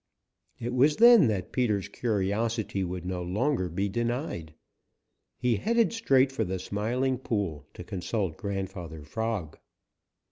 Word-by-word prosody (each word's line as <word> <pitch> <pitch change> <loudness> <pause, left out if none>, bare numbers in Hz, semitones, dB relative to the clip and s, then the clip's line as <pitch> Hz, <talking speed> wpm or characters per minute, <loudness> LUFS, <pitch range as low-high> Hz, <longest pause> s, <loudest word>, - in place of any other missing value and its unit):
It 120 +1 -4
was 140 +4 +4
then 235 - +8
that 100 -4 -2
Peter's 105 -6 0
curiosity 105 -1 -1
would 90 -1 -4
no 90 -1 -3
longer 95 +3 0
be 95 +5 -1
denied. 120 - -3 0.8
He 125 -3 +1
headed 230 - +2
straight 135 - +3
for 135 -4 -1
the 95 -1 -2
Smiling 120 +7 -1
Pool 95 - -2
to - - -7
consult 95 -1 -2
Grandfather 95 -6 -5
Frog. 105 -1 -3
105 Hz, 130 wpm, -28 LUFS, 90-125 Hz, 0.8 s, then